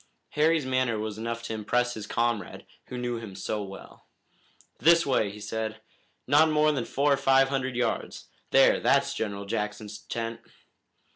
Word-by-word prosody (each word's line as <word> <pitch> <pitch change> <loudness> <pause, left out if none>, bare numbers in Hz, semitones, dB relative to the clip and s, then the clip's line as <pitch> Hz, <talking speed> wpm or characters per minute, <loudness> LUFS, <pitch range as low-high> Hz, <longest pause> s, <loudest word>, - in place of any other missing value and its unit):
Harry's 155 0 +2
manner 130 -3 0
was 110 0 -4
enough 115 +1 -4
to 115 - -4
impress 120 +3 0
his 110 -2 -7
comrade, 115 -5 -2 0.2
who 125 - -6
knew 120 -1 -2
him 105 -4 -9
so 105 +3 -3
well. 100 -1 -11 0.7
"This 170 +1 +5
way," 125 -6 +1
he 105 +1 -10
said. 110 +1 -4 0.5
"Not 150 +4 +5
more 155 0 +3
than 130 -6 -2
four 140 +1 +2
or - - +1
five 135 -1 +4
hundred 130 -2 -2
yards. 120 - -2 0.2
There, - - +5
that's - - +2
General 100 -2 -4
Jackson's 105 0 -4
tent!" 115 0 -5
115 Hz, 160 wpm, -27 LUFS, 110-135 Hz, 0.7 s, This